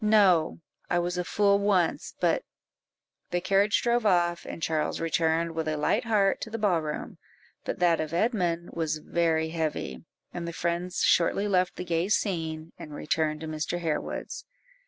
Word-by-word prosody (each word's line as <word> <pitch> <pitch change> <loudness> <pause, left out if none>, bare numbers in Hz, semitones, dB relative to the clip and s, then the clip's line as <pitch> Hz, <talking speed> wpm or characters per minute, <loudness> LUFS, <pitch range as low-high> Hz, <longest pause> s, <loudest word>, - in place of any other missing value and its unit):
"No; 195 -7 +4 0.3
I 175 - +2
was 175 +1 -1
a - - 0
fool 200 +4 +3
once, 200 -4 +1
but - - +2 0.4
" - - -57
The 175 - 0
carriage 195 +3 +2
drove 240 0 +2
off, 175 -4 +2
and - - -6
Charles 155 -1 0
returned 165 0 +1
with 160 -1 -3
a 155 0 -1
light 210 +11 +1
heart 205 -4 +2
to - - -4
the 225 - -4
ball 195 -6 +2
room; 150 -1 -5 0.5
but - - -3
that 175 -2 +3
of 155 -1 -4
Edmund 175 -3 0
was 160 -2 -1
very 160 0 0
heavy, 155 - -3 0.3
and 170 -1 -4
the 170 - -4
friends 175 +2 -2
shortly 195 +4 +3
left 185 -2 +1
the 180 - -5
gay 170 +2 0
scene, 165 -6 -1
and 150 -1 -8
returned 155 0 -1
to 160 - -5
Mr. 155 +2 -2
Harewood's. 160 -3 -3
170 Hz, 175 wpm, -27 LUFS, 160-195 Hz, 0.5 s, No